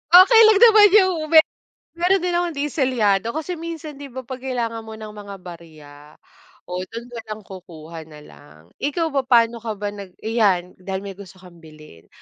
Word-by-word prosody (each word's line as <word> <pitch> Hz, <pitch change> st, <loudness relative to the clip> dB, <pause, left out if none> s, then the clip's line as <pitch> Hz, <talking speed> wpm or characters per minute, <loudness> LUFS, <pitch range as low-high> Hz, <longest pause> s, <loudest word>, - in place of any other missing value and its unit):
Okey 445 Hz, +6 st, +8 dB
lang 430 Hz, -2 st, +4 dB
naman 435 Hz, -3 st, +8 dB
'yong 375 Hz, -4 st, +5 dB, 0.2 s
me 320 Hz, -, +9 dB, 0.6 s
mayroon 370 Hz, +2 st, +2 dB
din 360 Hz, -, -1 dB
akong 345 Hz, -1 st, -1 dB
'di 285 Hz, +1 st, -2 dB
selyado 230 Hz, -5 st, 0 dB
kasi 320 Hz, +2 st, -5 dB
minsan 320 Hz, -3 st, -8 dB
'di 285 Hz, -, -8 dB
ba, 260 Hz, 0 st, -8 dB
'pag 260 Hz, +1 st, -8 dB
kailangan 230 Hz, -3 st, -4 dB
mo 220 Hz, -, -8 dB
ng 215 Hz, -1 st, -9 dB
mga 205 Hz, -1 st, -10 dB
barya, 160 Hz, -4 st, -13 dB, 0.7 s
o 180 Hz, 0 st, -6 dB
do'n 230 Hz, +3 st, -8 dB
na 235 Hz, -1 st, -7 dB
lang 215 Hz, 0 st, -7 dB
kukuha 170 Hz, -4 st, -11 dB
na 150 Hz, -1 st, -14 dB
lang. 75 Hz, -, -18 dB, 0.2 s
Ikaw 320 Hz, +3 st, -2 dB
ba 275 Hz, -1 st, 0 dB
paano 235 Hz, -2 st, +3 dB
ka 220 Hz, -1 st, -5 dB
ba 205 Hz, 0 st, -4 dB
nag 200 Hz, -3 st, -11 dB
ayan, 200 Hz, -6 st, 0 dB
dahil 190 Hz, +1 st, -5 dB
may 195 Hz, -1 st, -9 dB
gusto 190 Hz, -2 st, -12 dB
kang 180 Hz, -2 st, -16 dB
bilhin, 155 Hz, -, -16 dB
225 Hz, 190 wpm, -21 LUFS, 185-290 Hz, 0.7 s, me